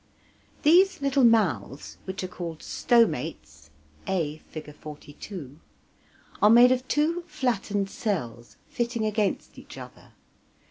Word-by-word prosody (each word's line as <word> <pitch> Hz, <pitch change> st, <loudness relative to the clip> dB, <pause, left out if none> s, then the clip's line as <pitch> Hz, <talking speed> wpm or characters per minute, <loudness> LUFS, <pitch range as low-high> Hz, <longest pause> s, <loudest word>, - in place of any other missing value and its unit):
These 365 Hz, +6 st, +5 dB
little 275 Hz, -1 st, +2 dB
mouths, 160 Hz, -, +1 dB
which 190 Hz, 0 st, -5 dB
are -, -, -2 dB
called 170 Hz, -3 st, -7 dB
stomates 80 Hz, -, 0 dB, 0.4 s
(a, 160 Hz, -5 st, -1 dB
Fig. 155 Hz, -2 st, -8 dB
42) 150 Hz, 0 st, -10 dB, 0.8 s
are 210 Hz, -, +6 dB
made 240 Hz, +3 st, +8 dB
of 255 Hz, 0 st, 0 dB
two 320 Hz, +4 st, +1 dB
flattened 220 Hz, -8 st, -1 dB
cells, 120 Hz, -, -4 dB
fitting 235 Hz, -2 st, -2 dB
against 210 Hz, -2 st, -1 dB
each -, -, -13 dB
other. -, -, -12 dB
200 Hz, 110 wpm, -26 LUFS, 150-245 Hz, 0.8 s, made